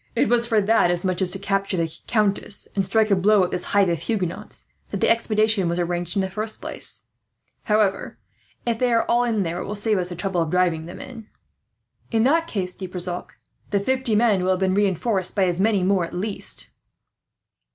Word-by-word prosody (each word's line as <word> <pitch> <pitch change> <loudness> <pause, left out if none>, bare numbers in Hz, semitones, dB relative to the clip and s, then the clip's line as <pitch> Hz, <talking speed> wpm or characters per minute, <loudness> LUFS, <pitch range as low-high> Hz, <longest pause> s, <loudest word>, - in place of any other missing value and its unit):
It - - +2
was 235 0 +2
for 225 -2 +3
that, 210 -3 +3
as 175 +1 0
much 185 0 -1
as 185 - +3
to 195 - +1
capture 195 -1 -1
the 165 -2 -2
countess 210 -2 0
and 195 - +2
strike 215 +3 +2
a - - +6
blow 200 +1 +4
at 180 - -2
this 180 - -3
hive 200 -1 +3
of 170 -2 0
Huguenots, 185 -4 -4 0.2
that - - -4
the - - +3
expedition 215 -4 +2
was 170 - -1
arranged. 175 +2 -2 1.5
However, 210 -3 +1 0.5
if 230 -2 -1
they 250 -1 +2
are 230 - +2
all 240 +1 +3
in 225 -4 0
there, 170 0 -3
it - - -4
will 210 - -4
save 210 -1 +1
us 180 0 -2
the 175 - -6
trouble 180 0 -1
of 165 - -1
driving 170 -2 +1
them 175 - -9
in." 230 -4 -10 0.8
"In 225 -2 +2
that 330 +6 +3
case 185 - -2
though, 185 - -7
De - - -18
Brissac, 180 -1 -4 0.4
the 200 - +1
fifty 260 +1 0
men 210 -4 +3
will 185 - 0
have 185 - -2
been 190 -1 +1
reinforced 195 0 0
by 200 - +3
as 175 -1 -1
many 205 -2 +2
more, 190 -1 +2
at 170 - -6
least." 200 +3 -3
195 Hz, 205 wpm, -23 LUFS, 180-220 Hz, 1.5 s, a